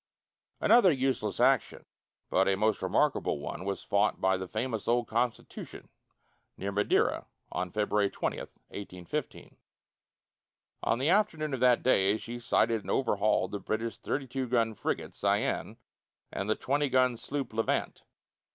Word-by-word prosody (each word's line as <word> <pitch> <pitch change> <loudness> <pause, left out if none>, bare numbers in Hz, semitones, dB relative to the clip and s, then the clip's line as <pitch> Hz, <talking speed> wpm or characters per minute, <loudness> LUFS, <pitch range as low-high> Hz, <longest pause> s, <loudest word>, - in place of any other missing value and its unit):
Another 230 -6 +6
useless 130 -7 -1
action, 130 0 +2 0.5
but 95 +1 +3
a 95 -1 +2
most 110 +1 +1
remarkable - - +1
one, 75 +5 -6
was 100 0 -3
fought 100 +1 +1
by 95 0 +2
the 95 0 -4
famous 110 +1 -3
old 120 0 +2
Constitution, 115 0 -3 0.7
near 100 +1 -3
Madeira, 105 +1 +1 0.2
on 90 0 -2
February 105 +1 +1
20, - - -3
1815. 90 -4 -7 1.2
On 115 - +1
the 135 +5 +1
afternoon 160 -7 +1
of 130 - -2
that 125 -1 +4
day 100 -5 +3
she 120 +2 -7
sighted 115 -1 +2
and - - -10
overhauled 105 -5 +1
the 100 - -3
British 110 +1 -3
32 135 -1 -3
gun 115 -2 +1
frigate - - -3
Cyane - - -1 0.5
and 100 - -3
the 110 - +3
20 145 +1 0
gun 130 -1 +3
sloop 135 0 -4
Levant. 115 0 -1
115 Hz, 140 wpm, -30 LUFS, 100-130 Hz, 1.2 s, Another